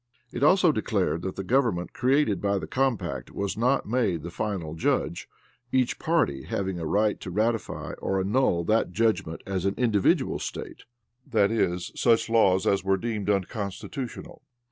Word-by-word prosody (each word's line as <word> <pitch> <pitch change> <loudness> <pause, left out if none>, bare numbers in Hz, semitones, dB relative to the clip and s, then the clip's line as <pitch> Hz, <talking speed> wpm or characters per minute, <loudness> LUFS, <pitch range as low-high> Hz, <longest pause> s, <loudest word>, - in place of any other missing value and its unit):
It 120 - -5
also 175 +3 +5
declared 100 - -1
that 95 +1 -4
the 95 - -4
government 115 -6 +1
created 130 -6 +2
by 100 0 +1
the - - -4
compact 130 -5 -1
was 100 -1 -3
not 125 +5 +1
made 105 -9 0
the 85 - -6
final 90 -6 -3
judge, 80 - -1 0.4
each 130 -2 +1
party 155 - +1
having 95 -2 -2
a 80 - -3
right 105 +4 +1
to - - -7
ratify 110 +4 -1
or 95 - -1
annul 95 -3 +1
that 110 +6 +2
judgment 110 -8 0
as 95 -2 -2
an 100 - 0
individual 110 -6 +2
State, - - -7 0.4
that 110 -6 +2
is, 90 -6 0
such 115 -1 +2
laws 95 -5 +4
as 100 - +2
were 95 0 +2
deemed 105 -1 -3
unconstitutional. 100 +5 -4
105 Hz, 160 wpm, -26 LUFS, 95-120 Hz, 0.4 s, also